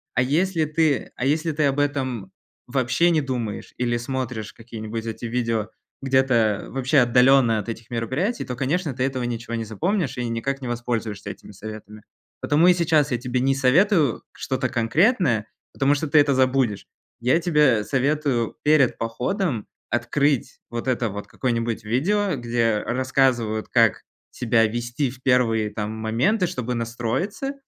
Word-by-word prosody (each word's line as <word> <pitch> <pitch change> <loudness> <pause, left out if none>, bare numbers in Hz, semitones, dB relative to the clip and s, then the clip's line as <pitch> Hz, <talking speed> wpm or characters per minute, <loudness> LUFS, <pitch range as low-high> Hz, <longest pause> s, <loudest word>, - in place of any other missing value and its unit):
А 125 - +3
если 165 +4 +1
ты 150 -4 0
а 125 - -3
если 155 +3 +1
ты 150 +1 0
об 140 0 +1
этом 140 +1 -2 0.4
вообще 130 +7 +2
не 155 -2 +2
думаешь 120 -6 -4
или 120 -1 0
смотришь 120 -3 -4
какие-нибудь 115 -1 -7
эти 115 +1 -6
видео 115 -2 -1 0.3
где-то 130 -6 +2
вообще 135 +3 0
отдалённо 125 -1 +4
от 105 - -6
этих 115 +1 -7
мероприятий, 130 - -2
то, 125 - -5
конечно, 150 +4 -1
ты 125 +1 -2
этого 130 -2 -1
ничего 120 -1 -4
не 115 - -2
запомнишь 145 - -1
и 125 -1 -2
никак 135 +4 -2
не 125 - -5
воспользуешься 115 -4 -3
этими - - -13
советами. 105 +1 -10 0.4
Потому 155 +4 +3
и 180 - +7
сейчас 160 -5 +2
я 125 - +1
тебе 125 +1 -2
не 135 +1 +2
советую 150 - +3
что-то 130 -1 -2
конкретное, 120 - +2 0.3
потому 140 +1 +2
что 155 +2 -2
ты 145 - +2
это 145 -1 +4
забудешь. 130 -5 +1 0.3
Я 130 +7 +3
тебе 150 -10 +3
советую 135 -3 0
перед 150 -4 +4
походом 125 - -2 0.2
открыть 135 +3 0
вот 120 +2 -5
это 125 -2 0
вот 100 +1 -7
какое-нибудь 115 -3 -2
видео, 185 - +1
где 115 -2 0
рассказывают, 125 -4 0
как - - +3 0.3
себя 115 -2 +2
вести 120 +4 -2
в 130 0 -13
первые 115 -4 +2
там 105 0 -4
моменты, 115 - +1
чтобы 125 -7 -3
настроиться, 120 - -2
125 Hz, 155 wpm, -23 LUFS, 115-145 Hz, 0.4 s, и